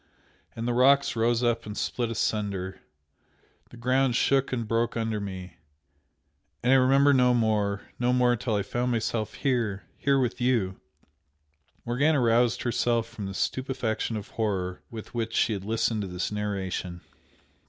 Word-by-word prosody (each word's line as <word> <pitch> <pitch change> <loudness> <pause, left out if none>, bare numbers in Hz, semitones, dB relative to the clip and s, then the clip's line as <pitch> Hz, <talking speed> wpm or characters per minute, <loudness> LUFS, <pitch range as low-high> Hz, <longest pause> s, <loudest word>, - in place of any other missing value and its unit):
and 115 +1 -3
the 120 - +1
rocks 140 +2 +4
rose 115 +1 +1
up 115 -2 0
and 105 - -6
split 120 -2 -1
asunder 100 -4 -2 0.9
the 120 - -13
ground 130 +1 +2
shook 135 +1 +2
and 120 -3 -2
broke 115 +1 0
under 110 -2 -1
me 95 -4 -7 1.1
and 125 +2 +4
I - - +7
remember 135 +2 +5
no 125 -2 +4
more 105 -3 +1 0.2
no 125 0 +2
more 125 -1 +3
till 110 -1 -2
I 100 - 0
found 120 +5 -1
myself 115 -1 -2
here! 115 -7 -1 0.2
here 140 -1 +2
with 125 -2 -1
you!" 115 -7 +1 1.0
Morgana 140 +5 +2
roused 120 0 +2
herself 120 -1 +1
from 105 -4 -7
the 95 - -6
stupefaction 125 -4 -2
of 105 +3 -8
horror 95 -6 -2
with 110 -2 -9
which 115 -1 -2
she 110 - +2
had 100 -2 -5
listened 110 0 0
to 100 - -4
this 90 +1 -3
narration. 95 -4 -3
115 Hz, 155 wpm, -27 LUFS, 105-125 Hz, 1.1 s, I